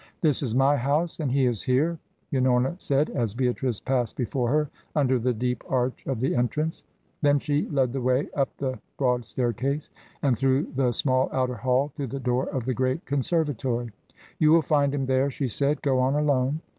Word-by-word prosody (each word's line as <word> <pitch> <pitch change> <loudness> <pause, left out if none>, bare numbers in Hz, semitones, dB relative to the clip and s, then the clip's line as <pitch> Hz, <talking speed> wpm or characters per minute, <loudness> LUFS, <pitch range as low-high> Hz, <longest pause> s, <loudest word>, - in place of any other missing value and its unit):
"This 150 -5 +2
is 120 -5 -1
my 135 +2 +4
house, 145 +7 0
and 145 -5 -1
he 135 0 +3
is 120 -4 0
here," 150 +6 +1 0.3
Unorna 130 +2 +2
said, 140 +2 +1
as 115 -5 -2
Beatrice 125 -2 0
passed 125 -4 -1
before 125 -1 -1
her, 150 +2 +2 0.3
under 130 -4 +2
the 125 +2 +1
deep 125 +2 -2
arch 125 -1 -1
of 135 -4 -1
the 130 - +1
entrance. 150 +6 -1 0.4
Then 145 -1 +4
she 145 +1 -1
lead 130 -4 +1
the 135 - -2
way 130 +3 +1
up 140 -2 +1
the 130 -2 -3 0.2
broad 125 -3 +1
staircase, 130 +6 -2 0.3
and 135 -4 +3
through 135 +3 +1
the 130 -2 +2
small 130 +2 +1
outer 130 -1 0
hall 130 +5 +1
to 140 -2 -3
the 135 +3 -5
door 125 0 0
of 130 -4 -3
the 130 - 0
great 130 +6 -1
conservatory. 135 -5 -1 0.5
"You 155 0 +5
will 165 0 +5
find 145 -2 +2
him 140 -1 -1
there," 130 +1 +2
she 135 0 -2
said. 140 +5 0
"Go 135 -3 +2
on 130 +2 +2
alone." 145 0 +1
130 Hz, 195 wpm, -26 LUFS, 125-145 Hz, 0.5 s, You